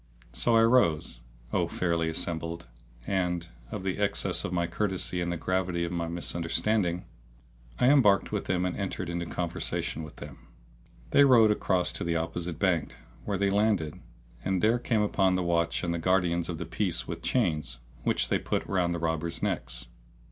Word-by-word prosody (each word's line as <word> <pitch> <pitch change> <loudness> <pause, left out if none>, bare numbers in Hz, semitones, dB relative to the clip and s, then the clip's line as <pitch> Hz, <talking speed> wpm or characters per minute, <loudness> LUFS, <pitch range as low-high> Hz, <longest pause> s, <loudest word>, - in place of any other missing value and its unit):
So 115 - +2
I 115 - +6
rose, 100 - +3 0.3
O - - +2
fair 85 -2 -1
assembly; 85 0 0 0.4
and, 90 -3 -1 0.2
of - - -5
the 95 +1 -2
excess 100 -1 +1
of - - -3
my 85 -1 +1
courtesy 90 0 -1
and 85 0 -1
the 85 - -2
gravity 90 0 -1
of 85 - -3
my 85 -1 -1
understanding, 85 +3 -1 0.7
I 125 - +4
embarked 110 -9 +4
with - - -2
them 90 0 0
and 90 - -2
entered 95 -3 -3
into 85 0 -3
conversation 85 -1 -3
with 75 -2 -9
them. - - -11 0.6
They 145 - +7
rowed 120 -6 +6
across 95 -3 +1
to - - -3
the 85 0 0
opposite 85 0 -3
bank, 85 -3 0 0.3
where 100 - -1
they 100 +1 +1
landed 100 -6 +1 0.4
and 95 -2 0
there 115 +3 +4
came 115 -3 +1
up 105 - -3
the 95 -2 +3
watch 85 -1 0
and 85 -1 -1
guardians 90 -1 +1
of 85 - -3
the - - -5
peace - - -1
with - - -5
chains, 75 -7 0 0.2
which - - +1
they - - +2
put - - -2
round 90 -3 0
the - - -3
robbers' 80 0 -2
necks. - - -2
90 Hz, 175 wpm, -28 LUFS, 85-95 Hz, 0.7 s, They